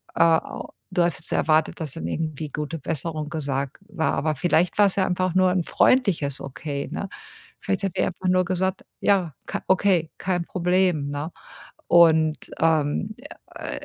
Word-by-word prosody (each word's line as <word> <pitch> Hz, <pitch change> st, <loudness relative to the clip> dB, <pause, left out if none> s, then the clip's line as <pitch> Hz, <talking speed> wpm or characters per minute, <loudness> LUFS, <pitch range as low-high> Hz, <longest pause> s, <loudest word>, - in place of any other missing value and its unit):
äh, -, -, +1 dB
a 165 Hz, -1 st, +2 dB, 0.2 s
du 180 Hz, -2 st, +2 dB
hast 170 Hz, -1 st, 0 dB
jetzt -, -, -9 dB
erwartet, 155 Hz, +2 st, +2 dB
dass 155 Hz, -5 st, -4 dB
dann 80 Hz, -, -6 dB
irgendwie 155 Hz, -, -3 dB
„Gute 150 Hz, +3 st, -4 dB
Besserung“ 155 Hz, +1 st, -3 dB
gesagt 140 Hz, -3 st, -3 dB
war. 185 Hz, -6 st, -1 dB
Aber 155 Hz, +1 st, 0 dB
vielleicht 175 Hz, +4 st, +1 dB
war's 200 Hz, -2 st, +5 dB
ja 190 Hz, -, +3 dB
einfach 185 Hz, 0 st, 0 dB
nur 185 Hz, -1 st, +4 dB
'n 180 Hz, -1 st, +1 dB
freundliches 175 Hz, -, +2 dB
Okay, 140 Hz, +1 st, -5 dB
ne? 200 Hz, -, -3 dB, 0.5 s
Vielleicht 195 Hz, 0 st, -2 dB
hat 195 Hz, -2 st, -2 dB
die -, -, +2 dB
ja -, -, +2 dB
einfach 185 Hz, +1 st, -4 dB
nur 185 Hz, 0 st, +4 dB
gesagt: 190 Hz, +1 st, -1 dB, 0.2 s
„Ja, 180 Hz, -8 st, +2 dB
ka -, -, -3 dB
okay, 185 Hz, -4 st, +3 dB
kein 180 Hz, -2 st, -1 dB
Problem“, 180 Hz, -5 st, +1 dB
ne? 145 Hz, +4 st, -4 dB, 0.6 s
Und, 160 Hz, -2 st, +4 dB
ähm, 160 Hz, +6 st, +1 dB, 0.4 s
ä -, -, -6 dB
165 Hz, 170 wpm, -24 LUFS, 155-185 Hz, 0.6 s, war's